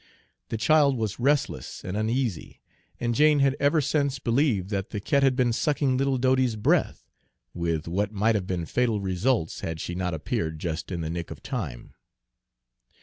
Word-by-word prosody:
The 115 - -2
child 140 +4 +4
was 110 -2 -3
restless 140 - 0
and 90 - -4
uneasy, 110 -3 -2 0.4
and 120 0 0
Jane 150 +3 +5
had 135 -1 +3
ever 145 +2 +3
since 140 -1 0
believed 120 -6 +1
that 100 -1 -2
the 105 - -4
cat 140 +7 +1
had 135 -2 +3
been 125 -2 +2
sucking 140 0 +1
little 135 0 +1
Dodie's 130 -2 +2
breath, 105 - +1 0.5
with 85 -2 -2
what 100 +4 -1
might 110 +2 +2
have 100 -4 -2
been 90 -3 -2
fatal 115 +1 0
results 95 0 0
had 80 -1 -4
she 85 - -4
not 90 -1 -2
appeared 80 +1 -2
just 80 +2 -4
in 85 -2 -3
the 80 - -3
nick 85 0 -4
of - - -10
time. 90 - -5
110 Hz, 175 wpm, -26 LUFS, 90-135 Hz, 0.5 s, Jane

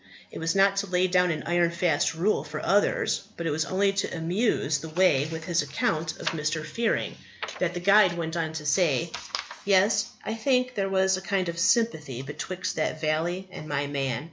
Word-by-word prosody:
It - - -7
was 165 +2 -1
not 195 0 +4
to 200 - 0
lay 180 0 +2
down 180 0 +3
an 155 -2 -2
iron 175 0 +2
fast 170 -2 +1
rule 175 -2 +1
for 155 0 -6
others, 200 0 +1
but 170 - -4
it 165 - 0
was 160 +2 0
only 195 +2 +1
to 195 -3 -2
amuse 165 -4 0
the 160 +2 -7
way 155 -4 +3
with 160 0 -6
his 170 -1 +1
account 155 +2 -2
of - - 0
Mr. 155 0 -2
Fearing, 230 -1 -1 0.4
that 180 0 -1
the - - -2
guide 195 0 +5
went 165 0 -3
on 165 -2 -1
to 155 -1 -6
say: 160 0 +2 0.5
"Yes, 200 +3 +3 0.2
I 220 - -2
think 250 +2 +1
there 195 -4 -1
was 190 0 +2
a - - -6
kind 190 -2 -1
of 170 0 -5
sympathy 160 - +1
betwixt 170 +7 -5
that 155 0 -1
valley 165 +4 -1
and 155 - -8
my 145 -1 -1
man. 135 -4 -2
170 Hz, 200 wpm, -26 LUFS, 155-195 Hz, 0.5 s, guide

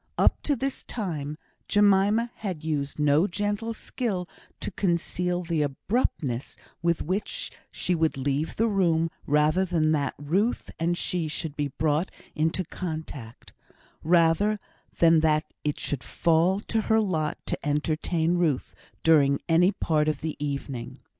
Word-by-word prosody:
Up - - +3
to 290 - +1
this 270 0 -3
time 155 - -4 0.3
Jemima 205 +3 +4
had 185 -7 -4
used 145 -3 -2
no 150 +4 +4
gentle 205 +4 -2
skill 215 -5 -3 0.3
to - - -4
conceal 180 0 0
the 165 -2 0
abruptness 145 - -1 0.2
with 170 -1 +1
which 190 +5 -2 0.2
she 180 - -1
would 160 -4 +1
leave 140 +3 -1
the 225 - +2
room 165 -6 +2 0.2
rather 150 +5 +3
than 165 -4 +1
that 145 -3 0
Ruth 185 - 0
and 170 +1 +1
she 175 -3 -1
should 155 -1 -4
be 145 -1 -1
brought 155 +3 +1 0.2
into 160 +4 0
contact 155 -10 -7 0.5
rather 175 +5 +3 0.4
than 165 -1 +6
that 155 -1 +3 0.2
it 150 -1 -1
should 140 -3 -3
fall 170 +4 +2
to 225 0 -1
her 220 +1 +3
lot 160 -8 0
to - - -4
entertain 160 +3 0
Ruth 155 -7 0 0.3
during 140 -4 +5
any 175 +3 +5
part 155 -6 +1
of 155 -2 -1
the 160 -1 -3
evening. 140 -4 -4
165 Hz, 140 wpm, -26 LUFS, 150-190 Hz, 0.5 s, than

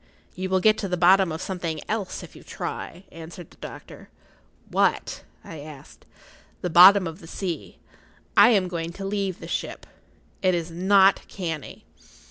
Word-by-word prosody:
"You 185 +1 -4
will 190 0 +2
get 215 +1 +4
to 200 - -3
the 180 -1 -2
bottom 185 +1 +5
of 160 - -5
something 170 -4 -4
else 210 -3 -3
if - - -13
you - - -13
try," 175 +3 -7
answered 165 +1 -11
the - - -20
doctor. - - -11 0.6
"What?" - - 0 0.2
I 160 - -9
asked. 145 -2 -13 0.5
"The 180 - -3
bottom 185 +3 +8
of 165 +1 -6
the 165 - -13
sea. 165 - -5 0.6
I 205 - +8
am 200 -6 +3
going 170 -1 -5
to 195 +2 -7
leave 195 -2 -2
the - - -9
ship. - - -4 0.6
It 185 -2 +2
is 170 0 -4
not 190 +3 +4
canny." 165 -7 -6
180 Hz, 165 wpm, -24 LUFS, 165-195 Hz, 0.6 s, bottom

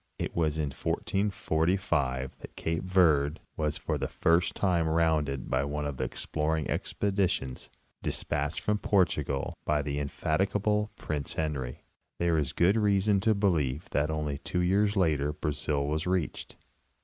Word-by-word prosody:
It - - -4
wagin 75 -3 0
1445 80 -8 0
that - - -11
cape 80 0 -2
Verd 80 -6 +3 0.2
was 75 -1 -1
for - - -2
the - - -1
first 85 +1 +2
time 85 -4 +2
rounded 80 -5 +1
by 65 +2 +1
one 75 +1 -2
of 70 -2 -3
the - - -1
exploring 80 0 -2
expeditions 95 -10 -1 0.3
despatched 75 +1 -1
from 105 0 0
Portugal 75 -10 +1
by 75 -1 +1
the 70 0 -2
in 70 - -1
defatigable 105 +7 0
Prince 75 -3 -3
Henry. 70 -6 -3 0.3
There 85 -2 +2
is 70 -2 -1
good 90 +7 +3
reason 100 -1 +3
to 110 +2 +3
believe 80 -8 0
that 75 +1 +1
only 75 -2 -2
two 90 +3 -2
years 100 +4 +2
later 75 -6 +2
Brazil 75 -2 -1
was 75 +3 -1
reached. 90 -3 -2
80 Hz, 145 wpm, -29 LUFS, 75-95 Hz, 0.3 s, Verd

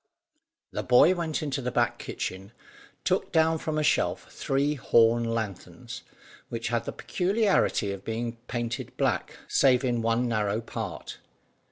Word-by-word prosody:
The - - -2
boy 125 +8 +6
went 165 -4 -2
into 140 -2 -2
the 125 - -2
back - - +1
kitchen, 95 +4 -5 0.5
took - - 0
down 160 0 +3
from 155 0 -2
a 155 - +1
shelf 150 - +1
three 140 +2 0
horn 115 -3 +4
lanthorns, 110 -4 -5 0.5
which 115 -1 -3
had 115 -1 -1
the - - -3
peculiarity 195 - +1
of 100 0 -6
being 115 +1 -3
painted 120 -1 -4
black - - 0
save 130 -1 +4
in 120 -2 +1
one 115 +2 +1
narrow 105 -2 0
part. 115 - -6
120 Hz, 145 wpm, -27 LUFS, 115-150 Hz, 0.5 s, boy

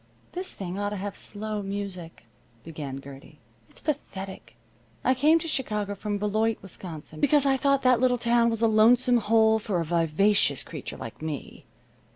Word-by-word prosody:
"This 365 +1 -5
thing 190 0 -5
ought 205 0 -1
to 210 - -4
have 200 +1 -5
slow 215 0 -4
music," 195 -7 -6 0.4
began 145 -4 -6
Gertie. 140 +2 -12 0.3
"It's - - -8
pathetic. 195 -10 -5 0.5
I 255 - +4
came 300 +5 +4
to 330 - -4
Chicago 210 -9 -2
from 205 +1 -3
Beloit, 215 +2 0
Wisconsin, 165 -5 -9
because 290 - +4
I 270 -1 +4
thought 275 +1 +2
that 255 -2 +5
little 250 0 +3
town 235 0 +3
was 225 0 -2
a - - +6
lonesome 240 +3 +5
hole 220 0 +4
for 200 -4 -1
a 165 - -1
vivacious 170 +5 +2
creature - - -7
like - - -9
me. 155 -3 -6
210 Hz, 170 wpm, -26 LUFS, 185-240 Hz, 0.5 s, a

